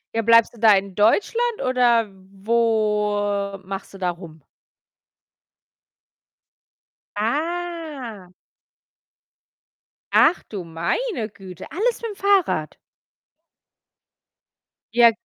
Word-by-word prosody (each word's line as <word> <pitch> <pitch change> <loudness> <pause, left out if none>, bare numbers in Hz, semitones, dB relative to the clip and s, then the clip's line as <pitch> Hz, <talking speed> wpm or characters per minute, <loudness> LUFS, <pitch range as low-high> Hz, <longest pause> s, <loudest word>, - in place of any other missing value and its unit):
Ja, 225 - +1
bleibst 230 +1 +5
du - - -16
da 220 -1 +6
in 195 -1 -2
Deutschland 445 - +1
oder 240 -3 +3 0.3
wo 210 -3 0
machst 195 +1 -7
du 195 - -11
da 180 - 0
rum? 170 -3 -9 2.8
Ah. 295 - -4 1.8
Ach - - +4
du 195 -4 -5
meine 215 - -2
Güte, 185 -4 -11
alles 455 +7 -1
mit'm 455 -3 -5
Fahrrad? 385 - +1 2.2
Ja. 235 -1 +7
225 Hz, 85 wpm, -22 LUFS, 200-320 Hz, 2.8 s, Ja